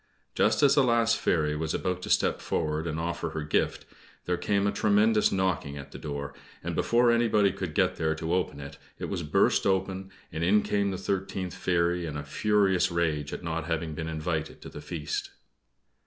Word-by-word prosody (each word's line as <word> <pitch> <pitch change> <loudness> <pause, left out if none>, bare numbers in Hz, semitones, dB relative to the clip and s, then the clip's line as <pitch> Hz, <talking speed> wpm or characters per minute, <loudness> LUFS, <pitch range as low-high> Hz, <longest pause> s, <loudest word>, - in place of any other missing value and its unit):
Just - - +2
as 140 -1 +6
the 140 -1 +5
last 115 -2 +3
fairy 75 -3 +1
was 80 +1 -2
about 90 -1 -2
to - - -6
step - - +2
forward 80 0 -1
and 80 0 -3
offer 85 0 -2
her 80 -1 -4
gift, 75 - 0 0.4
there 90 - +1
came 100 +2 0
a 100 - +2
tremendous 105 +1 +3
knocking 95 -7 -1
at 70 - -9
the - - -9
door, 70 -1 -5 0.3
and - - -3
before 120 0 +3
anybody 110 -4 +3
could 90 -5 -5
get - - +2
there 80 0 0
to 80 +1 -2
open 90 -5 -1
it, 70 0 -9 0.2
it - - -5
was 95 -3 -2
burst 75 +4 +2
open, 95 0 -1 0.2
and 80 - -3
in 100 +4 +4
came 100 -1 +1
the 95 - -3
thirteenth 95 -1 -3
fairy, 85 -1 0
in 75 -1 -4
a 75 - -4
furious 95 +4 +2
rage 80 -4 -1
at - - -6
not 85 -1 -3
having 80 -2 -2
been 80 +1 -4
invited 80 0 -3
to - - -8
the - - -9
feast. 80 -4 -4
85 Hz, 200 wpm, -28 LUFS, 80-100 Hz, 0.4 s, as